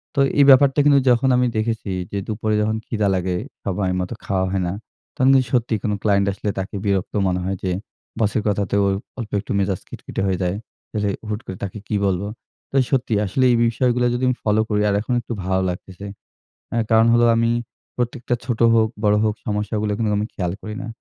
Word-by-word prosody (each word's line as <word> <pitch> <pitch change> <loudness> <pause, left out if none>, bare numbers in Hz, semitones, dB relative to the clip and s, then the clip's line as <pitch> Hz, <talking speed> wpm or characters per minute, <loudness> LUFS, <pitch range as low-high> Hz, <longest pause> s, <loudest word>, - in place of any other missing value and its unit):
তো - - 0 0.2
এই - - +8
ব্যাপারটা 135 +1 +6
কিন্তু 145 -1 +6
যখন 125 +2 +3
আমি 125 - +3
দেখেছি 110 -2 -2 0.2
যে 100 - -3
দুপুরে 110 0 -1
যখন 110 +1 0
ক্ষিদা 105 -2 0
লাগে, 90 0 -1 0.3
সময় 95 -1 -1
মত 90 -1 -3
খাওয়া 95 -1 0
হয় 95 -1 0
না, 85 - -2 0.4
তখন 130 - +2
কিন্তু 130 -1 +4
সত্যি 120 -2 +1
কোনো 105 -1 0
client 100 -2 +3
আসলে 105 - -3
তাকে 95 +3 -5
বিরক্ত 100 -2 0
মনে 90 0 0
হয় 95 +1 -2
যে, 95 - 0 0.5
boss 105 -2 +2
এর - - +1
কথাতেও 100 -1 +1 0.4
অল্পে 110 -3 -4
একটু - - -8
মেজাজ 95 -2 0
খিটখিটে - - -6
হয়ে 95 -2 0
যায়। 90 +1 0 0.5
রে 100 - +1 0.2
হুট 105 -1 -2
করে 95 - -6
তাকে 100 +2 -5
কি 105 - -1
বলব? 95 -2 +1 0.5
তো - - -7 0.2
সত্যি, 125 -4 +1
আসলে 115 +7 0
এই - - +4
বিষয়গুলো 125 +1 +1
যদি 120 +1 -2
আমি 125 - +1
ফলো 105 0 +2
করি 105 -1 +1
আর - - +1
এখন 125 - -2
একটু 120 - -6
ভালো 95 0 +1
লাগতেছে। 95 +2 -7 0.7
অ্যা 115 - +1
কারণ 110 +1 +5
হলো 120 0 +5
আমি, 115 0 +2 0.4
প্রত্যেকটা 120 0 -1
ছোট 120 -3 -2
হোক, 110 -1 +4 0.2
বড় 105 0 +4
হোক 110 -1 +2
সমস্যাগুলো 105 -1 -1
কিন্তু 110 -1 0
আমি 105 - 0
খেয়াল 90 -3 -2
করি 105 0 -6
না। - - -6
105 Hz, 205 wpm, -21 LUFS, 100-120 Hz, 0.7 s, এই